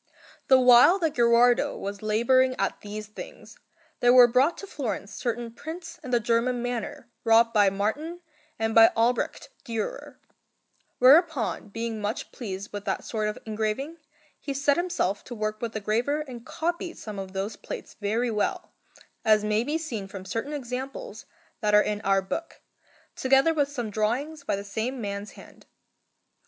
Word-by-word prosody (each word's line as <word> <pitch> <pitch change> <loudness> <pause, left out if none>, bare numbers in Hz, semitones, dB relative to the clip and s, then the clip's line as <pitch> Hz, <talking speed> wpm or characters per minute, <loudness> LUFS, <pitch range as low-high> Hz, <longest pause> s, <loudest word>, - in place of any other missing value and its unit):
The 265 -1 +6
while 250 +8 +7
that 325 -5 0
Gherardo 240 0 +4
was 200 0 -6
labouring 255 +4 +3
at - - -2
these 210 +1 -6
things, - - -11 0.4
there 245 - +5
were 250 -1 +9
brought 260 +7 +2
to - - -7
Florence 230 - -4
certain 235 -1 -3
prints 330 +5 -8
in 260 - -7
the 240 -1 +3
German 235 +2 +1
manner 245 +3 -4 0.2
wrought 230 0 +4
by 205 -3 +5
Martin 220 - -3 0.4
and 225 0 -1
by 225 0 +9
Albrecht 235 +2 0
Dürer; 230 -5 -5 0.8
whereupon, 285 0 +4
being 225 +1 -4
much 210 +4 -3
pleased 200 -4 -7
with 205 -1 -5
that - - -2
sort 215 -2 -2
of 210 - -3
engraving, 220 +9 -3 0.4
he 280 -2 -5
set 280 +1 +2
himself 345 - -1
to 245 - -7
work 215 0 -3
with 235 -1 -3
the 215 - -2
graver 235 +9 0
and 255 -5 -9
copied 345 +1 -3
some 210 -2 -7
of 190 -1 -7
those 200 +2 -3
plates - - -8
very 225 +4 -1
well, 210 -1 -2 0.5
as 215 -1 +4
may 215 +1 +1
be 295 +5 -1
seen 240 -12 -5
from 190 -1 -9
certain 225 +9 -4
examples 270 - -6 0.3
that 210 -1 +2
are 210 - +6
in 210 -1 -2
our 195 -1 +2
book, 325 - -5 0.5
together 270 +5 +3
with 290 -3 +1
some 240 -7 -4
drawings 260 +9 -1
by 280 - -1
the 200 - -5
same 225 +6 -3
man's 200 -1 -5
hand. - - -16
235 Hz, 165 wpm, -26 LUFS, 215-275 Hz, 0.8 s, were